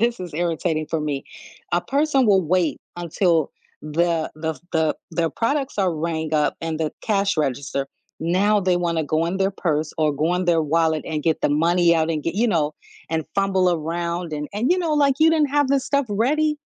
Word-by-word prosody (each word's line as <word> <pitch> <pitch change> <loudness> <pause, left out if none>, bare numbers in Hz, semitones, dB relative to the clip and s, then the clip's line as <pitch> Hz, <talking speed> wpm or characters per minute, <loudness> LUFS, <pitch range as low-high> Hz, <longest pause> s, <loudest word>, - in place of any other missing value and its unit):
this 235 -2 +1
is 180 -4 -7
irritating 165 -1 -1
for 155 +1 -2
me- 145 -2 -3 0.5
a 175 - +3
person 275 - +1
will 195 -3 +4
wait 170 0 0 0.2
until 170 -2 +1 0.3
the 165 +1 0
the 160 -2 -4
the 160 -2 +2 0.2
the 165 0 0
products 275 0 -1
are 185 -4 +2
rang 160 0 -2
up 150 -1 +2
and 165 -1 -3
the 155 -2 -1
cash 200 -2 +1
register, 140 -1 -1 0.3
now 195 +6 +2
they 185 -2 +2
wanna 170 -2 0
go 155 +3 0
in 185 +3 -2
their 195 0 +2
purse 155 -5 -1
or 155 -1 +2
go 160 +5 +1
in 180 0 -1
their 170 -2 +3
wallet 160 0 +1
and 155 -2 -3
get 160 -1 +1
the - - +2
money 170 +3 +3
out 160 0 +1
and 155 -2 -2
get 165 - -2
you 225 +4 +2
know, 155 -6 0 0.4
and 160 -1 -1
fumble 190 -2 +2
around 170 +1 -3
and 150 0 -4
and, 220 +8 0
you 360 - +4
know, 335 -3 0
like, 285 -2 +3
"You 320 +1 +5
didn't 310 -3 +2
have 290 -2 +2
this 275 -1 +1
stuff 280 -1 +1
ready?" 300 +8 +1
170 Hz, 205 wpm, -22 LUFS, 155-200 Hz, 0.5 s, You